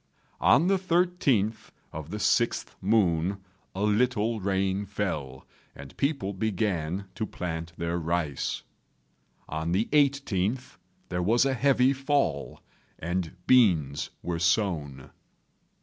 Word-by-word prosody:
On 160 - +5
the 195 +1 +3
13th 170 - +1 0.2
of 80 -1 -7
the 105 - -4
6th 105 - +1
moon 95 -3 +2 0.4
a 100 - -2
little 110 +1 +1
rain 95 0 0
fell, 80 -10 -4 0.3
and 70 0 -11
people 140 -9 -1
began 95 -3 -1
to 110 - -3
plant 85 -2 -5
their 85 +1 -2
rice. 80 -4 -2 0.8
On 80 +2 -2
the 105 +5 +2
18th 130 -6 +1 0.3
there 90 0 -1
was 115 +8 +3
a 135 - +2
heavy 130 0 +3
fall, 135 - -1 0.4
and 90 +1 -3
beans 85 - +3
were 85 -1 -2
sown. 85 -7 0
100 Hz, 115 wpm, -27 LUFS, 85-125 Hz, 0.8 s, On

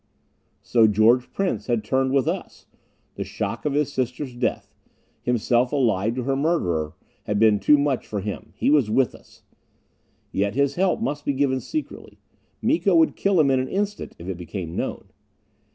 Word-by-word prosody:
So 115 -2 +4
George 110 +4 +3
Prince 195 -1 -2
had 120 -3 0
turned 130 0 +1
with 135 -1 +2
us! - - -4 0.5
The - - -2
shock - - -4
of 150 - 0
his 145 -1 0
sister's 125 +1 -3
death 120 - -2 0.5
himself 120 +1 +1
allied 115 -6 +1
to 130 - -2
her 135 +2 0
murderer! 90 - 0 0.3
had 105 - -1
been 105 -1 +4
too 150 - +5
much 140 -3 0
for 105 - -3
him. 105 +2 -6
He - - +1
was 140 -8 +3
with 130 +3 +2
us! - - -18 0.9
Yet 100 +2 -1
his 140 0 +2
help 190 +3 +1
must 145 -10 -2
be 140 - 0
given 130 -1 +1
secretly. 310 - -6 0.5
Miko 200 - +2
would 165 -1 +4
kill 195 -3 +2
him 140 -3 +4
in 130 - +3
an 130 - -2
instant 205 +1 -3
if 85 - -10
it 95 -2 -4
became 90 -1 -6
known. - - -4
130 Hz, 175 wpm, -23 LUFS, 110-145 Hz, 0.9 s, too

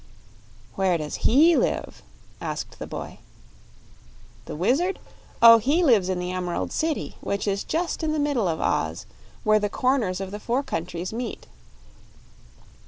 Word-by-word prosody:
"Where 190 -3 +1
does 150 -2 -5
HE 315 +8 +6
live?" - - -1 0.4
asked - - -5
the - - -6
boy. - - -7 1.3
"The - - -6
Wizard? 275 - +1 0.5
Oh, 230 0 +10
he 290 +10 +2
lives 220 - +4
in 185 - 0
the 180 0 -3
Emerald 180 -1 -3
City, 315 -2 -2
which 200 +1 -2
is 200 0 0
just 340 +2 -2
in 315 -1 0
the 310 - -1
middle 285 -8 +1
of 160 -2 -1
Oz, 80 +1 -1 0.4
where 215 0 +4
the 205 0 -1
corners 240 -7 0
of 190 -1 -5
the 210 - -6
four 245 +6 -1
countries 175 - -4
meet." 240 +2 -5
215 Hz, 150 wpm, -25 LUFS, 185-280 Hz, 1.3 s, Oh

